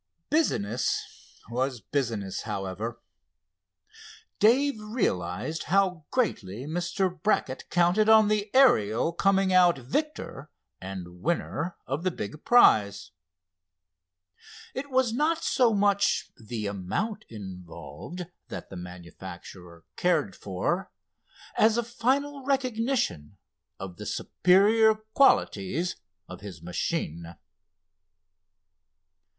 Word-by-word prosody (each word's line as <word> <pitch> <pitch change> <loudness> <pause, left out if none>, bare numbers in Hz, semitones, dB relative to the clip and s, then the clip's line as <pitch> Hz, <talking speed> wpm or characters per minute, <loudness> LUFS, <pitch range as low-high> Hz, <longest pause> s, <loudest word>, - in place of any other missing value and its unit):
Business 125 - -1
was 130 +1 -1
business, 110 -4 -2
however. 105 +2 -4 1.4
Dave 255 +4 +4
realized 155 - -2
how 185 -4 +1
greatly 125 - -1
Mr. 175 +2 -2
Brackett 155 -10 0
counted 180 +5 +3
on 220 -1 +7
the 210 0 0
Ariel 160 - +4
coming 195 0 +2
out 180 -3 +5
victor 150 - -4 0.3
and 90 -2 -8
winner 170 - -2
of 135 +4 -3
the 185 - +2
big 150 - -7
prize. 100 - +4 1.6
It 280 +2 -5
was 260 -3 +2
not 310 +6 +1
so 250 -4 +3
much 205 -1 +2
the 110 -1 -6
amount 175 - -3
involved 95 - -8 0.2
that 95 - -8
the - - -7
manufacturer 90 -1 -10
cared 160 - +1
for 105 - -2 0.7
as 220 +1 +4
a 235 - +1
final 270 +4 -1
recognition 250 - -1 0.4
of 95 -2 -7
the - - -7
superior 215 +4 +4 0.2
qualities 170 - +2 0.3
of 90 - -10
his 100 -5 -9
machine. 85 -1 -3
170 Hz, 95 wpm, -27 LUFS, -, 1.6 s, on